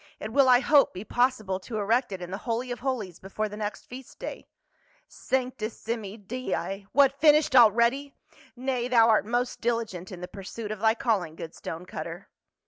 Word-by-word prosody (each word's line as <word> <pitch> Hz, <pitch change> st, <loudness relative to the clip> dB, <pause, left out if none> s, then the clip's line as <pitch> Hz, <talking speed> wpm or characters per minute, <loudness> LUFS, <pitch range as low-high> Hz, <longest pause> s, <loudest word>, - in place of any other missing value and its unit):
It 215 Hz, +1 st, -6 dB
will, 275 Hz, -1 st, +5 dB
I 250 Hz, 0 st, +6 dB
hope, 280 Hz, -4 st, +4 dB
be 185 Hz, -, -5 dB
possible 220 Hz, -6 st, 0 dB
to 215 Hz, +4 st, -6 dB
erect 225 Hz, +4 st, +1 dB
it 185 Hz, -2 st, -5 dB
in 175 Hz, -, -7 dB
the 195 Hz, -, -4 dB
Holy 240 Hz, +2 st, -3 dB
of 245 Hz, -, -4 dB
Holies 235 Hz, -10 st, -3 dB
before 205 Hz, +3 st, -3 dB
the 210 Hz, -, -8 dB
next 210 Hz, 0 st, -5 dB
feast 255 Hz, +1 st, -11 dB
day." -, -, -7 dB, 0.6 s
"Sanctissimi 230 Hz, -4 st, -3 dB
dei! 205 Hz, -3 st, -4 dB
what, 280 Hz, 0 st, +3 dB
finished 300 Hz, -3 st, +5 dB
already? 240 Hz, +4 st, +4 dB, 0.4 s
Nay, 250 Hz, -1 st, -2 dB
thou 230 Hz, -2 st, +5 dB
art 215 Hz, -1 st, +3 dB
most 245 Hz, +2 st, -1 dB
diligent 225 Hz, -7 st, -2 dB
in 180 Hz, -, -8 dB
the 180 Hz, -, -6 dB
pursuit 205 Hz, +3 st, -7 dB
of 215 Hz, -, -5 dB
thy 220 Hz, +1 st, +3 dB
calling, 195 Hz, -10 st, -1 dB
good 165 Hz, 0 st, -8 dB
stone 165 Hz, +2 st, -7 dB
cutter." 170 Hz, 0 st, -7 dB
230 Hz, 180 wpm, -27 LUFS, 195-255 Hz, 0.6 s, I